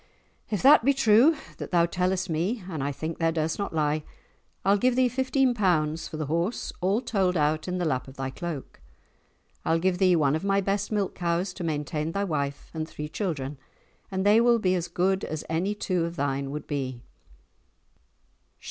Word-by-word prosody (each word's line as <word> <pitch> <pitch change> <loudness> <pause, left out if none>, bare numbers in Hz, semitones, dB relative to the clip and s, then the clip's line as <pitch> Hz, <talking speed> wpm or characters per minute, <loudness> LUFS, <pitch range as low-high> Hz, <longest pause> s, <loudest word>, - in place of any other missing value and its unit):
"If 210 +1 -2
that 280 -1 +8
be 280 +2 +3
true 245 +6 +5 0.2
that - - -6
thou 170 -2 +4
tellest 185 +2 0
me 180 +7 -1
(and 160 -7 -4
I 140 - -1
think 160 +4 -5
thou 165 -1 +2
durst 160 +1 -1
not 200 - -2
lie) 155 -1 0 0.6
I'll 200 +1 +4
give 250 +2 +2
thee 255 0 +4
fifteen 260 +1 +1
pounds 165 -7 +1
for 155 - -7
the 155 - -2
horse, 170 - -2
all 195 +6 +2
told 190 -7 +1
out 155 +2 +1
in 180 0 -2
the 175 - -1
lap 130 -5 -1
of 135 - -12
thy 135 0 -3
cloak; 155 -1 -6 0.8
I'll 165 - +2
give 180 +1 0
thee 185 -2 +5
one 145 -3 +2
of 160 - -3
my 200 0 +2
best 200 +2 -1
milk 205 -3 0
cows 175 +2 -1
to 180 - -7
maintain 155 0 -2
thy 200 - 0
wife 145 -6 -3
and 160 0 -4
three 150 0 -6
children, 150 -7 -3 0.5
and 190 0 -2
they 210 +3 +6
will 240 0 +5
be 185 -5 +1
as 175 -2 -1
good 190 +3 0
as 155 -1 -4
any 180 +6 0
two 185 -4 -1
of 170 0 -5
thine 140 -1 -1
would 150 +1 -5
be." 130 -4 -4
175 Hz, 195 wpm, -27 LUFS, 155-200 Hz, 0.8 s, that